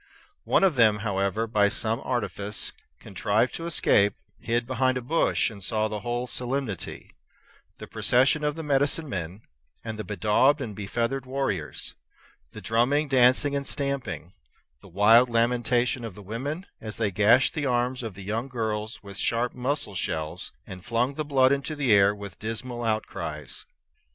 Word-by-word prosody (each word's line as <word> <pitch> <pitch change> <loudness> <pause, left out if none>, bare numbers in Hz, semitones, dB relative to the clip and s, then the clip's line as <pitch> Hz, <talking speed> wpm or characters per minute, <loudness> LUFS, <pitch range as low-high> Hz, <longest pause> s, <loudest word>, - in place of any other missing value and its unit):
One - - +3
of 180 -8 +3
them, 110 -3 +4
however, 100 +2 0
by 105 -2 +3
some 110 +2 +1
artifice, 105 -5 -2 0.3
contrived 105 +4 0
to 165 - -5
escape, 105 -11 +3 0.2
hid 120 0 -1
behind 130 +1 +1
a - - -1
bush, 155 -2 +1
and 100 -3 -10
saw 110 +1 0
the 105 -1 -4
whole 120 +2 -2
solemnity, 125 -5 -4 0.7
the - - -8
procession 135 +5 +2
of 150 0 0
the 165 - -6
medicinemen 135 - -1 0.4
and 110 -1 -6
the - - -2
bedaubed 110 +8 +2
and 115 -7 -5
befeathered 120 +6 -2
warriors; 130 - -3 0.6
the - - -10
drumming, 135 +7 +1
dancing, 130 +2 +4
and 140 -1 -2
stamping; 125 - -3 0.5
the - - -15
wild 110 +7 +5
lamentation 120 +1 +1
of 110 -5 -6
the 105 - -11
women 140 - -4 0.2
as 110 -1 -6
they 110 -3 0
gashed 105 +6 +4
the 150 -3 -1
arms 125 +1 0
of 110 -6 -6
the 100 - -9
young 110 +6 -2
girls 110 -3 -3
with 100 -1 -10
sharp 120 +4 0
mussel 130 -3 -2
shells, 80 -4 -2
and 90 -1 -10
flung 120 +3 0
the 155 - -3
blood 135 -3 +3
into 140 +2 -1
the 135 -6 +2
air 100 0 +5
with 100 -3 -9
dismal 120 +2 -4
outcries. 110 -1 -3
115 Hz, 160 wpm, -26 LUFS, 105-130 Hz, 0.7 s, wild